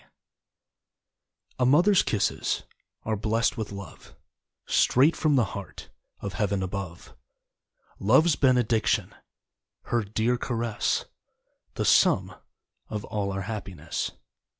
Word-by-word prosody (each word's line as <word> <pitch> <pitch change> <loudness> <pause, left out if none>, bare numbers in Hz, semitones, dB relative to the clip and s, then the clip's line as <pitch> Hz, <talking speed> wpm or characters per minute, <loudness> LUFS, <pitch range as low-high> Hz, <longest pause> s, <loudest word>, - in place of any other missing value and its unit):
K.) - - -27 1.5
A 125 - +3
Mother's 175 +9 +5
kisses 105 -2 -1 0.4
Are 110 - -1
blessed 110 +2 0
with 110 -4 -5
love 100 -1 -10 0.5
Straight 140 +6 +4
from 155 -2 +2
the 125 -4 +4
heart 100 -1 -9 0.3
Of 100 -2 -5
Heaven 100 -1 -1
above. 95 -3 -6 0.8
Love's 145 - +4
Benediction, 125 -4 +2 0.7
Her 120 -1 0
dear 110 +4 0
caress, 115 -3 -1 0.7
The - - -1
sum - - +4 0.6
of 105 -1 -4
all 100 -2 -2
our 95 0 -3
happiness. 95 -6 -5
110 Hz, 105 wpm, -26 LUFS, 100-125 Hz, 1.5 s, Mother's